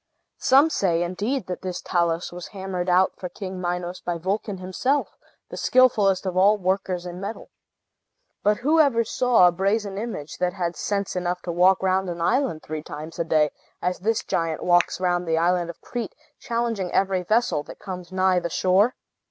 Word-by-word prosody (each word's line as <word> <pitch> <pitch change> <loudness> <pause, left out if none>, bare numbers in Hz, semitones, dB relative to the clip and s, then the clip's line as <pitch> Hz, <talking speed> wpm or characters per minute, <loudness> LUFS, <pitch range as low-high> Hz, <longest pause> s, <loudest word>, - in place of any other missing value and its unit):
Some 280 +5 +5
say, 175 - +1
indeed, 210 +9 -2
that 180 - -5
this 185 -1 -4
Talus 170 -1 0
was 175 0 -8
hammered 190 -3 -4
out 185 +1 +4
for 180 - -6
King 185 0 -7
Minos 175 0 -3
by 175 -1 -2
Vulcan 195 +3 -2
himself, 190 +10 -1 0.3
the - - -8
skilfullest 215 -7 +3
of 185 -1 -2
all 200 +3 +5
workers 185 -1 -1
in 180 +1 -7
metal. 205 +3 -6 0.9
But 210 0 +2
who 300 +6 +2
ever 265 -7 +4
saw 235 -4 +4
a - - +4
brazen 195 +2 -1
image 210 -10 -6
that 180 0 0
had 175 -2 -2
sense 200 +4 -2
enough 180 0 -2
to 175 - -3
walk 185 +3 +4
round 190 0 +1
an 170 -1 -5
island 230 - 0
three 155 0 -5
times 155 +2 -8
a - - +2
day, 155 -3 +2 0.3
as 180 0 -2
this 220 +3 0
giant 165 -1 -2
walks 175 0 +3
round 180 -1 0
the 160 0 +1
island 175 +1 +1
of 170 - -8
Crete, 235 -4 -5 0.2
challenging 230 -6 -2
every 190 -1 +1
vessel 220 -2 +1
that - - -10
comes 180 -2 -8
nigh 185 -1 +2
the 170 - -4
shore? 190 +8 +2
185 Hz, 185 wpm, -24 LUFS, 175-210 Hz, 0.9 s, Some